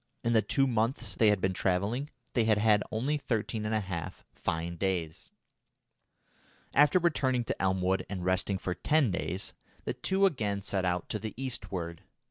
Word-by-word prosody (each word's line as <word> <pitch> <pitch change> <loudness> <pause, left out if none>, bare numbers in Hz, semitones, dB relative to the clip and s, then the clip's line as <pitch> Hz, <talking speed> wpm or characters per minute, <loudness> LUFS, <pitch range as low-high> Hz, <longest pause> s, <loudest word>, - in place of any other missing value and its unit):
In 115 0 +1
the 110 - +5
two 135 +4 +2
months 115 -3 0
they 110 +4 +3
had 105 -2 +4
been 95 0 +1
travelling, 100 +11 0 0.2
they 115 -3 +3
had 110 -2 +4
had 105 -1 +4
only 130 +7 0
thirteen 115 -5 -2
and 110 - 0
a 110 - +1
half 90 -5 -5
fine 85 +1 -2
days. 85 -3 -2 1.4
After 145 +5 +6
returning 135 -8 +2
to - - -3
Elmwood 95 0 +1
and 95 -3 -4
resting 95 +1 +1
for 90 -1 -3
ten 145 +3 +2
days, 90 +2 -3 0.3
the - - -2
two 190 +1 +2
again 105 - 0
set 95 -1 -1
out 90 -1 0
to 105 - -2
the 110 +1 -6
eastward. 95 -10 -4
105 Hz, 170 wpm, -30 LUFS, 95-125 Hz, 1.4 s, After